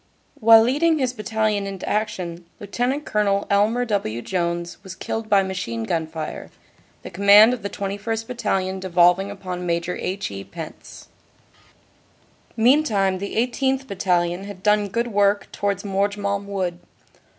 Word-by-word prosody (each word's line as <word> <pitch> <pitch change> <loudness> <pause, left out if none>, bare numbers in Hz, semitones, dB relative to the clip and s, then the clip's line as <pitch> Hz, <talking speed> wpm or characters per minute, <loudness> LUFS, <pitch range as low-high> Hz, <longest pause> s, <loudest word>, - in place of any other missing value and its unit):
While 225 0 +7
leading 305 +7 +2
his 260 -3 0
Bat 215 -5 -8
talion 215 -2 0
into 195 -2 -6
action, 180 -5 -3
Lt. 245 +8 -2
Col. 200 -1 +1
Elmer 215 +5 +2
W. 120 - -2
Jones 170 -1 -2
was 190 -2 -9
killed 225 +2 -5
by 200 -1 +4
machine 185 -13 -4
gun 160 +7 -1
fire, 160 -1 -6 0.5
the - - -8
command 200 +5 +7
of 250 - -5
the 200 - -4
21st. 205 +3 -4
Battalion 195 -6 -2
devolv 180 -1 +4
ing 195 +1 -4
upon 185 -3 -6
Maj. 170 -1 -1
H. 185 - -3
E. 100 0 -6
Pense. 160 - -10 1.5
Meantime 220 -7 +3
the 200 +1 -5
18th. 265 +3 0
Battalion 180 -3 0
had 200 -2 -10
done 210 -1 +3
good 235 +4 -2
work 205 -1 +2
towards 200 -1 -2
Morgemont 200 0 -1
wood. 185 -3 -3
200 Hz, 145 wpm, -22 LUFS, 180-220 Hz, 1.5 s, While